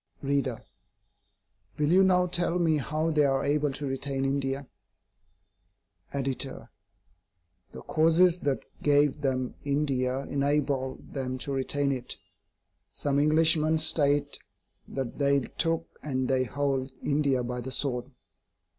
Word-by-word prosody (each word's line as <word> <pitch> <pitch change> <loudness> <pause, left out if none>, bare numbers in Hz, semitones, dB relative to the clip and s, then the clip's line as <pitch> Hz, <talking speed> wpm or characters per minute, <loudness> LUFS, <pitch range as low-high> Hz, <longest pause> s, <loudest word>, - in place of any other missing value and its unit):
READER: 135 -3 -1 1.1
Will 150 0 +1
you 190 +2 +6
now 180 -1 +4
tell 175 -1 0
me 165 -3 +2
how 155 +4 -1
they 150 -1 +3
are 135 -1 +2
able 145 0 +1
to 145 +2 -5
retain 135 0 -2
India? 135 0 -1 1.4
EDITOR: 135 -1 -3 1.0
The - - -10
causes 165 +3 +4
that 135 -6 -1 0.2
gave 145 0 +3
them 130 -2 -1
India 135 -3 0
enable 140 -1 0
them 130 -2 -5
to 140 - -4
retain 140 +1 0
it. 125 -2 -3 0.7
Some 140 -1 0
Englishmen 155 +1 +4
state 145 -2 +1 0.5
that 135 -1 -5
they 140 -1 +3 0.2
took, 165 0 0
and 130 -3 -2
they 130 0 +2
hold, 135 +1 -1
India 140 -3 +1
by 125 0 -4
the 130 +2 -6
sword. 125 -1 -2
140 Hz, 120 wpm, -28 LUFS, 135-150 Hz, 1.4 s, you